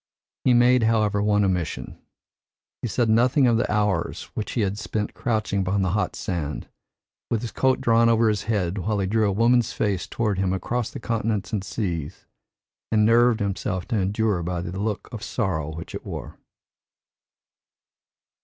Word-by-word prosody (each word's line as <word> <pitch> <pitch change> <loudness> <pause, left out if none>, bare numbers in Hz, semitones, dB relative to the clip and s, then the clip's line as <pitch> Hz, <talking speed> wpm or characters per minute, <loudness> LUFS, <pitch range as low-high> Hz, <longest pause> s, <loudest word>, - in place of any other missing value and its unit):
He 125 - +4
made, 125 +1 +5
however, 110 -2 +2
one 105 -1 +3
omission. 85 -9 -2 0.8
He - - -2
said 120 +1 +1
nothing 125 +5 +4
of 120 -2 +4
the 115 - 0
hours 105 -2 0
which 105 - -4
he 120 - 0
had 100 0 -1
spent 105 -1 -3
crouching 110 -5 -1
upon 95 +1 0
the 90 - 0
hot 105 -1 -1
sand, 75 -5 -4 0.6
with 115 0 -1
his 120 - -4
coat 130 -1 +2
drawn 115 -1 +4
over 115 0 +4
his 105 -1 0
head, 100 -4 -1
while 105 +4 -1
he 100 - 0
drew 105 +2 +2
a - - +1
woman's 115 +3 +3
face 100 -4 -1
toward 105 -5 -1
him 95 -1 +1
across 115 +5 -2
the - - -8
continents 110 -6 -2
and 100 -3 -1
seas 85 -9 -4 0.7
and 105 -1 +4
nerved 115 0 +4
himself 100 -1 -2
to 115 -4 +1
endure 100 0 0
by 85 +1 -2
the 90 +2 -5
look 105 0 -2
of 115 - -6
sorrow 80 -12 -2
which 85 - -8
it - - -6
wore. - - -7
105 Hz, 170 wpm, -24 LUFS, 95-115 Hz, 0.8 s, made